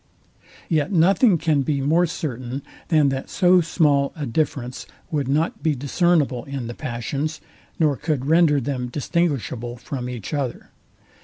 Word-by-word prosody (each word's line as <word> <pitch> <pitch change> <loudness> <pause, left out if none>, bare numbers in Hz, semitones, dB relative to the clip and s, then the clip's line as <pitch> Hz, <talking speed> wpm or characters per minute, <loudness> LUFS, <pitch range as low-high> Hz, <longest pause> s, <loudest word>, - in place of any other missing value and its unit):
Yet 155 -2 +1
nothing 190 +3 +4
can 155 -3 +1
be 140 0 0
more 160 +6 +3
certain, 130 -4 -4 0.2
than 155 -4 +4
that 135 0 -4
so 180 -1 +4
small 150 -4 +2
a 150 - -4
difference 125 -1 -2 0.2
would 145 -4 -1
not 150 +5 0
be 155 -3 +1
discernible 140 -2 +1
in 140 -3 -5
the 120 - -5
passions, 140 +5 -3 0.4
nor 150 -4 +2
could 150 -4 -2
render 160 -1 +4
them 130 -2 -3
distinguishable 125 - -2
from 125 0 -5
each 120 +2 -6
other. 140 -5 -3
145 Hz, 145 wpm, -22 LUFS, 130-160 Hz, 0.4 s, nothing